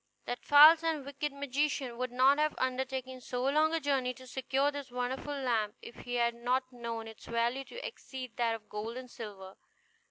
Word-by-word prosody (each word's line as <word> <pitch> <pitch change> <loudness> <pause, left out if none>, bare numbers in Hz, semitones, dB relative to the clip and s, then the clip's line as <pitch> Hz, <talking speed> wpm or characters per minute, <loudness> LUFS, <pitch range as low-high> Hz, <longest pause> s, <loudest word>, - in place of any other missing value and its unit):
That 245 - -4
false 310 +3 +9
and 315 -4 -1
wicked 285 +1 -3
magician 280 -2 -1
would 255 +1 -3
not 265 +3 +4
have 305 0 +2
undertaken 260 0 -2
so 250 0 -3
long 305 +4 +3
a 330 - +1
journey 270 -4 0
to 255 - -13
secure 265 +2 0
this 285 -2 -7
wonderful 250 +4 -3
lamp 230 -6 0
if - - -10
he 245 0 -5
had 235 -1 +2
not 245 +2 0
known 230 -2 -5
its 220 -1 -12
value 235 +3 0
to - - -8
exceed 260 - -8
that 230 -2 +1
of 215 -1 -12
gold 220 +3 -5
and 255 -1 -8
silver. 195 -4 -9
255 Hz, 190 wpm, -32 LUFS, 235-280 Hz, -, false